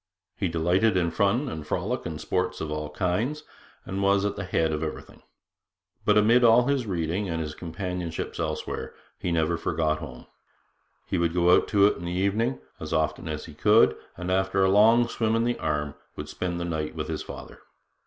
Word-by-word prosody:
He 95 - -1
delighted 90 +5 +2
in 85 -2 +1
fun 100 - +1
and 80 - -6
frolic 100 +9 -2
and 80 -2 -5
sports - - -1
of 80 - -4
all 75 0 -3
kinds, 105 - -1 0.4
and 95 +1 -3
was 100 0 +3
at 100 0 -1
the 100 - -4
head 80 -3 +1
of 75 0 -2
everything. 80 -1 -6 0.8
But 105 0 +4
amid 115 +4 +5
all 120 +1 +6
his 135 -4 0
reading 90 +2 -1
and 80 -1 -2
his 75 -2 -4
companionships 90 0 -5
elsewhere, - - -4 0.2
he 90 - -2
never 85 0 +1
forgot 80 -2 0
home. 65 -5 -9 0.8
He - - -1
would 85 0 0
go 90 0 +5
out - - +2
to 100 -2 +4
it 105 - +3
in 85 - -7
the 85 - -3
evening, 95 -4 0 0.2
as - - -5
often 80 0 0
as 75 -1 -4
he 80 - -11
could, 105 +8 +4 0.2
and 90 +1 -3
after 95 +1 +2
a 95 - +4
long 115 +4 +5
swim 115 -1 0
in 115 - +2
the 120 0 -1
Arm 75 -1 -1 0.2
would - - -6
spend 90 -1 -3
the 85 - -2
night 80 -2 -3
with - - -4
his - - -3
father. - - -9
90 Hz, 200 wpm, -26 LUFS, 80-105 Hz, 0.8 s, all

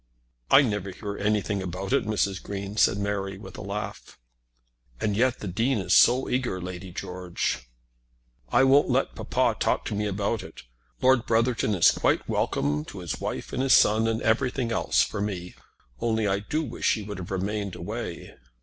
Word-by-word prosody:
"I 140 - +7
never 105 -5 -2
hear 100 +2 -6
anything 105 -1 0
about 95 +1 -4
it, - - +2
Mrs. 100 -3 0
Green," 100 0 -6
said 110 - +4
Mary, 100 -1 -2
with 100 - -11
a - - -7
laugh. 100 0 -6 0.8
"And 105 -2 0
yet 125 +3 +1
the 105 - -4
Dean 115 +8 0
is 95 - 0
so 125 +2 +5
eager, 125 -7 -1
Lady 90 0 -7
George!" 90 -8 -4 0.8
"I 130 - +4
won't 135 +2 +5
let - - +1
papa - - 0
talk - - +1
to - - -3
me 105 +1 -1
about 100 +2 -1
it. - - -11 0.4
Lord 130 -2 +4
Brotherton 115 -2 +2
is 85 - +6
quite - - 0
welcome 75 +1 0
to - - -10
his 90 -2 -5
wife - - -4
and - - -1
his 135 -1 +4
son, 110 +2 +5
and 115 0 -1
everything 120 +2 +1
else - - +2
for - - -4
me 90 -4 -4 0.5
only 110 -2 0
I 100 0 +1
do 150 +10 -2
wish 120 - 0
he 110 - -5
would 105 -1 -6
have 90 - -7
remained 100 +1 -2
away." 105 -1 -6
105 Hz, 180 wpm, -26 LUFS, 95-115 Hz, 0.8 s, I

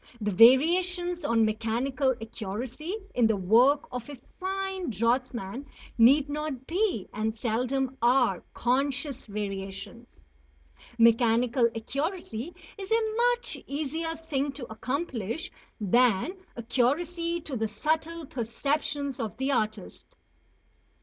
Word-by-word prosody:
The 210 -2 -1
variations 350 - +5
on 225 -1 +3
mechanical 245 +5 0
accuracy 235 - -5 0.2
in 240 -2 +4
the 220 - +2
work 240 +10 +4
of 250 +1 -6
a 290 - -6 0.2
fine 380 -1 -3
draughtsman 235 +2 -1 0.3
need 270 +5 +6
not 290 -3 -4
be, 355 - 0
and 220 +1 -2
seldom 255 +4 -1
are, 240 -6 +3
conscious 275 +2 -1
variations. 195 - -6 0.7
Mechanical 235 +1 +4
accuracy 275 - -3 0.3
is 390 +2 -7
a 440 -1 +1 0.2
much 485 +1 -4
easier 315 +3 -3
thing 290 -3 -2
to 270 -4 -6
accomplish 250 - -3 0.3
than 230 - +3 0.3
accuracy 330 +9 0
to 295 -4 -5
the 220 -2 0
subtle 315 +9 -2
perceptions 275 +3 -2
of 225 -3 -4
the 265 +2 0
artist. 215 - -3
255 Hz, 110 wpm, -28 LUFS, 225-310 Hz, 0.7 s, need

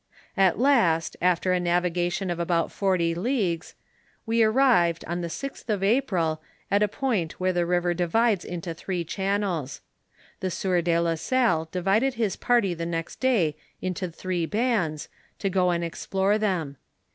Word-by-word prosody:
At 195 -3 +3
last, 230 - +3
after 180 +1 +2
a 180 - +2
navigation 175 +1 0
of 175 - -3
about 170 -1 0
forty 185 -4 +1
leagues, 180 -3 -1 0.5
we 230 0 +3
ar 220 - +4
rived, 220 -10 +3
on 175 +2 -3
the 170 - -3
sixth 275 +5 -7
of 205 -3 0
April, 190 - +1 0.3
at 200 +1 +3
a 210 - +4
point 210 - -1
where 185 0 +1
the 175 -1 0
river 175 0 +1
divides 190 +4 +1
into 170 -1 -5
three 175 +1 -3
channels. 190 -5 -2 0.6
The 185 - -2
sieur 180 0 0
de 170 0 +1
la 170 0 +1
Salle 170 -4 +1
divided 195 +9 +1
his 220 -5 0
party 235 -7 +2
the 170 0 -4
next 165 -1 -4
day 210 - +2 0.2
into 185 0 -3
three 175 0 -3
bands, 205 -9 0 0.3
to 195 - -2
go 180 -1 +2
and 170 -1 0
explore 195 +4 0
them. 170 -10 -1
180 Hz, 160 wpm, -26 LUFS, 170-210 Hz, 0.6 s, ar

